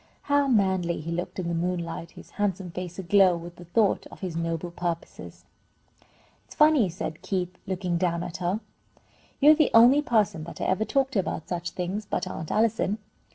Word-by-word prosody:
How 285 Hz, -1 st, +2 dB
manly 190 Hz, -7 st, +1 dB
he 165 Hz, +2 st, -5 dB
looked 175 Hz, +1 st, -4 dB
in 180 Hz, -2 st, -3 dB
the 170 Hz, -, -1 dB
moonlight, 170 Hz, -1 st, -3 dB
his -, -, -14 dB
handsome 195 Hz, -3 st, -2 dB
face 180 Hz, 0 st, -6 dB
aglow 190 Hz, -1 st, +4 dB
with 170 Hz, +1 st, -10 dB
the 175 Hz, -, -11 dB
thought 205 Hz, +4 st, +1 dB
of -, -, -14 dB
his 180 Hz, -4 st, -4 dB
noble 165 Hz, +1 st, -2 dB
purposes! 170 Hz, -1 st, -5 dB, 1.0 s
"It's -, -, -15 dB
funny," 300 Hz, -, +5 dB
said 160 Hz, -2 st, -5 dB
Keith, 185 Hz, -2 st, -2 dB
looking 180 Hz, -2 st, -1 dB
down 170 Hz, -1 st, 0 dB
at 175 Hz, +1 st, -6 dB
her, 185 Hz, +4 st, -1 dB, 0.8 s
"you're 295 Hz, +2 st, +8 dB
the 310 Hz, -1 st, +3 dB
only 245 Hz, +6 st, +7 dB
person 215 Hz, -, +1 dB
that 170 Hz, -, -9 dB
I -, -, -2 dB
ever 190 Hz, +4 st, +1 dB
talked 270 Hz, +1 st, 0 dB
to 205 Hz, -, +2 dB
about 160 Hz, -4 st, -3 dB
such 175 Hz, -1 st, -3 dB
things, 190 Hz, +4 st, -4 dB
but -, -, -1 dB
Aunt 160 Hz, -, -6 dB
Allison. 220 Hz, -2 st, +1 dB
180 Hz, 185 wpm, -26 LUFS, 170-215 Hz, 1.0 s, you're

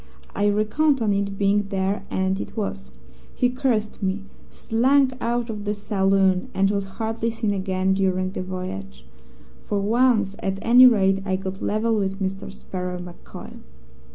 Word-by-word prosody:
I 205 Hz, 0 st, +2 dB
reckoned 220 Hz, +8 st, +2 dB
on 215 Hz, -3 st, +1 dB
it 200 Hz, 0 st, -2 dB
being 200 Hz, 0 st, +2 dB
there, 195 Hz, +1 st, -1 dB
and 190 Hz, +1 st, 0 dB
it -, -, -7 dB
was. 65 Hz, -, -4 dB, 0.5 s
He 250 Hz, 0 st, +2 dB
cursed 245 Hz, -5 st, -1 dB
me, 195 Hz, +1 st, -1 dB, 0.3 s
slunk 260 Hz, +4 st, +2 dB
out 235 Hz, 0 st, -1 dB
of 210 Hz, -2 st, -6 dB
the 210 Hz, 0 st, -2 dB
saloon, 195 Hz, -2 st, +1 dB
and 195 Hz, +1 st, +3 dB
was 200 Hz, -1 st, -1 dB
hardly 225 Hz, 0 st, -1 dB
seen 225 Hz, -2 st, -1 dB
again 190 Hz, -1 st, 0 dB
during 185 Hz, -1 st, 0 dB
the 185 Hz, -, -4 dB
voyage. 95 Hz, -, -6 dB, 0.6 s
For 205 Hz, -, -2 dB
once, 215 Hz, -1 st, +2 dB
at 195 Hz, 0 st, -2 dB
any 245 Hz, +2 st, +8 dB
rate, 195 Hz, -4 st, +3 dB
I 190 Hz, -1 st, -1 dB
got 190 Hz, 0 st, -5 dB
level 220 Hz, +2 st, 0 dB
with 195 Hz, 0 st, -2 dB
Mister 195 Hz, 0 st, -3 dB
Sparrow 180 Hz, -2 st, -5 dB
MacCoy. 175 Hz, -1 st, -10 dB
200 Hz, 155 wpm, -23 LUFS, 190-225 Hz, 0.6 s, any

